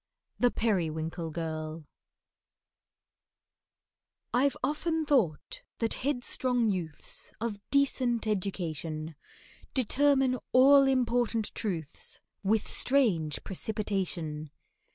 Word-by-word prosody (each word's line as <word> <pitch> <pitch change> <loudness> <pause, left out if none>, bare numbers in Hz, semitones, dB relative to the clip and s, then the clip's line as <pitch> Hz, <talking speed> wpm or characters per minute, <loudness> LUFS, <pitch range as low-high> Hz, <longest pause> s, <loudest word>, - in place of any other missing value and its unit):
THE 245 - +5
PERIWINKLE 165 -7 -1
GIRL 155 -1 -5 2.5
I'VE 270 +3 +2
often 315 +3 0
thought 275 - +1 0.2
that 225 -1 +1
headstrong 250 -3 +1
youths 170 -5 -5
Of 220 -2 -3
decent 260 -4 +2
education, 165 -6 -3 0.6
Determine 265 0 +3
all 275 +2 +7
important 240 -4 +1
truths, 170 -8 -4 0.2
With 210 +2 +1
strange 200 - +2
precipitation. 185 -7 -3
220 Hz, 75 wpm, -30 LUFS, 165-255 Hz, 2.5 s, all